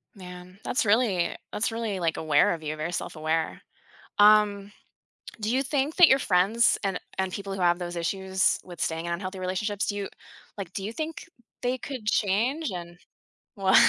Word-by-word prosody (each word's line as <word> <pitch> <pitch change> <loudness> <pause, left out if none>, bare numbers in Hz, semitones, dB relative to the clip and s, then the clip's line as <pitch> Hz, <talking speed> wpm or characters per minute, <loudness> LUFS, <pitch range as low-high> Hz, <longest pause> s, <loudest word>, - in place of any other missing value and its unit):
Man, 180 0 -11
that's 245 - 0
really 205 -5 +2 0.2
that's 220 - -1
really, 225 -4 -3
like, 165 -2 0
aware 155 0 +3
of 165 -2 -7
you, 155 0 -3
very 155 +3 -3
self-aware. 160 -1 -2 0.6
Um, 205 -1 +5 0.7
do 215 +3 -1
you 265 - +2
think 280 +2 -1
that 355 -3 +9
your 265 -1 +5
friends 205 +3 +3
and 195 -2 -1 0.2
and 190 -1 -1
people 195 0 -5
who 195 - -4
have 175 -1 +4
those 175 -1 -5
issues 190 +2 +1
with 175 -1 -9
staying 165 +1 -1
in 170 - -1
unhealthy 185 +2 -5
relationships, 195 +3 -1
do 205 - -1
you 200 -1 -3 0.5
like, 185 -3 -6
do 195 - -4
you 210 - -3
think 315 +4 -5 0.4
they 250 +1 0
could 255 -4 -7
change 230 +9 +1
and 175 -1 -7 0.6
Well 190 -1 +2
195 Hz, 175 wpm, -27 LUFS, 175-215 Hz, 0.7 s, that